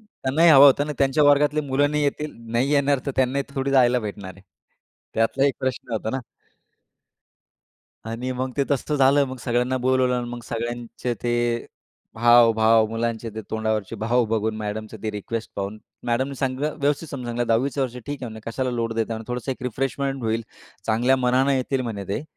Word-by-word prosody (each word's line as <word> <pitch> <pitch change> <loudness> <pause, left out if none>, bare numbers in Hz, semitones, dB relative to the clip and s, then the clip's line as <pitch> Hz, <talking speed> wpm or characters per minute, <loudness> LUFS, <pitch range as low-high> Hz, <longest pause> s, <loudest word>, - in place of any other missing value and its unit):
त्यांनाही 165 -6 +2
हवं 140 -2 +9
होतं 140 +1 +5
ना - - -8
आणि - - -3
त्यांच्या 140 +2 +3
वर्गातली 145 +1 +4
मुलं 145 +1 +1
नाही 150 0 0
येतील, 150 +1 -1 0.2
नाही 125 +4 +1
येणार, 140 -1 +3
तर - - 0
त्यांना 130 +1 +2 0.2
थोडी 135 0 -1
जायला 125 -2 +4
भेटणार 100 -3 -6
आहे. 95 - -17 0.7
त्यातला 115 +5 +2
एक 140 - +1
प्रश्न 130 -2 -3
होता 110 0 -2
ना. 130 - -2 1.9
आणि 115 +3 -4
मग 130 +1 -3
ते 140 - +2
तसं 140 +2 0
झालं. 140 +1 +5
मग 130 0 -6
सगळ्यांना 125 +2 0
बोलवलं 130 0 +2
आणि 120 -1 -2
मग 120 0 -6
सगळ्यांचे 120 +1 -4
ते 120 -1 0 0.5
हाव, 120 0 +6
भाव 110 0 +4
मुलांचे 115 +1 -3
ते, 110 - -4
तोंडावरचे 110 -1 -2
भाव 120 +3 +1
बघून, 110 -1 0
मॅडमचे 110 +1 -5
ते 110 - -1
रिक्वेस्ट 110 +2 -5
पाहून. 100 +2 -4 0.3
मॅडमनी 130 +4 0
सगळ 135 +2 -1
व्यवस्थित 145 +3 0
समजवलं. 120 -3 -3
10वीचं 130 +5 +1
वर्ष 125 -1 -3
ठीक 145 -2 -5
आहे 125 - -3
म्हणे, 110 0 -9
कशाला 130 +2 -2
लोड 115 -1 -2
देता 115 0 -1
म्हणे, 110 0 -7
थोडंसं 125 +2 -2
एक 130 - -12
रिफ्रेशमेंट 135 +2 -2
होईल. 115 0 0 0.4
चांगल्या 120 +4 +3
मनाने 130 +2 +2
येतील 130 +1 -1
म्हणे 105 -5 -4
ते. 100 - -2
125 Hz, 180 wpm, -23 LUFS, 115-135 Hz, 1.9 s, हवं